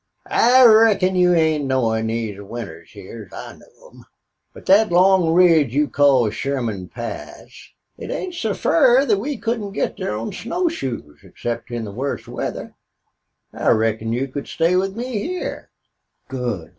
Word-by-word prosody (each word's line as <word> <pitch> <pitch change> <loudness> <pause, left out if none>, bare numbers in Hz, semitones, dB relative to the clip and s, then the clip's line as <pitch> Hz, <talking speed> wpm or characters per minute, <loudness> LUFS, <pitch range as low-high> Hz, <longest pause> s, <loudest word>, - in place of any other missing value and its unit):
"I 250 +2 +5
reckon 215 -4 +5
you 180 -1 +4
ain't 160 -3 +1
knowin' 115 -4 0
these 110 -3 -4
winters 100 -6 -9
hyar 105 +2 -10
as - - -22
I - - -8
know - - -20
them. - - -17 0.5
But - - -15
thet 210 +2 +4
long 180 -1 +4
ridge 165 -7 +4
you 150 +1 +2
call 140 -6 +3
Sherman 115 -6 -3
Pass 120 +4 -9 0.3
it - - -7
ain't 370 -1 -4
so 220 - -2
fur 245 - +3
we 260 +8 -4
couldn't 220 -3 -3
get - - -2
thar 105 - -3
on 115 - -5
snow 350 +10 -2
shoes 115 - -6
except 120 +1 -6
in 120 -2 -4
the 100 - -7
wust 130 +7 -4
weather. - - -5 0.8
I - - -1
reckon 110 0 +1
you 125 +4 -1
can 140 +1 -7
stay 170 +2 +1
with 190 +1 0
me 250 - -4
hyar." - - -6 0.6
"Good!" 120 -10 -4
140 Hz, 160 wpm, -20 LUFS, -, 0.8 s, I